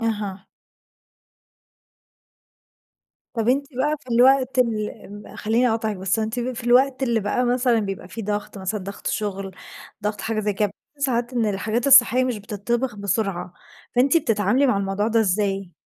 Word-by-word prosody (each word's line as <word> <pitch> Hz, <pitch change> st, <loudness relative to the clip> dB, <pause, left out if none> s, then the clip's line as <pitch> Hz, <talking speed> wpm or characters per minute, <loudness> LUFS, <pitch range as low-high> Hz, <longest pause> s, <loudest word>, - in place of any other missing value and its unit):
أها. 205 Hz, -4 st, -3 dB, 2.9 s
طب 225 Hz, 0 st, -1 dB
أنتِ 280 Hz, +2 st, +2 dB
بقى 295 Hz, +4 st, 0 dB
في 250 Hz, -3 st, -4 dB
الوقت 260 Hz, +1 st, +4 dB
ال 220 Hz, -4 st, +1 dB, 0.4 s
ال -, -, -12 dB
خليني 230 Hz, +3 st, +2 dB
أقاطعك 220 Hz, -2 st, -1 dB
بس، 190 Hz, +3 st, -1 dB
أنتِ 220 Hz, +3 st, -2 dB
في 240 Hz, -1 st, -4 dB
الوقت 260 Hz, +2 st, +3 dB
اللي 235 Hz, -3 st, +1 dB
بقى 205 Hz, +5 st, 0 dB
مثلًا 245 Hz, -1 st, +2 dB
بيبقى 195 Hz, -3 st, -5 dB
في 225 Hz, +4 st, -7 dB
ضغط 205 Hz, 0 st, -4 dB
مثلًا 195 Hz, +2 st, -3 dB
ضغط 200 Hz, +2 st, -9 dB
شغل 195 Hz, -2 st, -2 dB, 0.5 s
ضغط 210 Hz, 0 st, -2 dB
حاجة 220 Hz, -1 st, -2 dB
زي 210 Hz, 0 st, 0 dB
كده 210 Hz, +2 st, +1 dB
بتشوفي 285 Hz, +8 st, -24 dB
ساعات 240 Hz, 0 st, -1 dB
إن 235 Hz, -3 st, +1 dB
الحاجات 215 Hz, +5 st, -1 dB
الصحية 255 Hz, -2 st, +7 dB
مش 245 Hz, -4 st, -2 dB
بتطبخ 225 Hz, +4 st, -3 dB
بسرعة، 195 Hz, -3 st, -2 dB, 0.4 s
فأنتِ 270 Hz, +6 st, +4 dB
بتتعاملي 225 Hz, -, +2 dB
مع 250 Hz, -, +2 dB
الموضوع 195 Hz, +2 st, -1 dB
ده 230 Hz, 0 st, +2 dB
إزاي؟ 195 Hz, -2 st, 0 dB
220 Hz, 155 wpm, -23 LUFS, 205-245 Hz, 2.9 s, الصحية